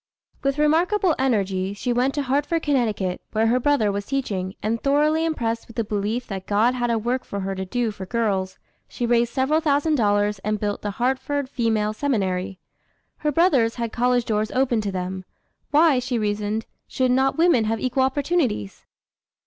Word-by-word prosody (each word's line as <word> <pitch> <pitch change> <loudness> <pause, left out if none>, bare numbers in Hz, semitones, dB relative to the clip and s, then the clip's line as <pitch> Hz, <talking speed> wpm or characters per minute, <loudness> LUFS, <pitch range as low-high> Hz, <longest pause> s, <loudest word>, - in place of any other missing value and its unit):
With 275 +1 0
remarkable 340 +5 +3
energy, 200 -6 0
she 240 +4 -1
went 255 +3 +1
to 290 - 0
Hartford, 290 +5 0
Conn., 220 -10 0
where 220 0 +2
her 240 +3 +3
brother 250 -6 +2
was 200 0 -4
teaching, 200 -9 -2
and 225 +2 -1
thoroughly 300 +3 +2
impressed 230 -8 -2
with 230 - -14
the 230 - 0
belief 215 +3 -2
that 190 -4 -6
God 215 +4 +3
had 240 -1 -1
a 230 - +2
work 240 +4 -1
for 200 - -5
her 195 0 -2
to 190 0 -4
do 240 +2 -1
for 190 -3 -8
girls, 195 -4 -1 0.3
she 240 - -3
raised 235 0 +2
several 270 +4 +1
thousand 295 +1 +2
dollars 205 -2 +1
and 210 +1 -2
built 205 0 -2
the 205 - -3
Hartford 265 +3 -1
Female 225 -5 0
Seminary. 195 -7 -1 0.6
Her 300 - -1
brothers 275 -8 +3
had 235 -2 -3
college 245 0 +1
doors 215 0 0
opened 255 -3 +1
to 205 -1 -3
them; 185 0 -4 0.5
why, 300 -3 +4
she 250 0 -2
reasoned, 210 0 -1 0.2
should 255 -1 0
not 265 +2 +2
women 325 -9 +4
have 225 +1 -1
equal 255 +1 0
opportunities? 265 - -1
235 Hz, 180 wpm, -23 LUFS, 205-270 Hz, 0.6 s, why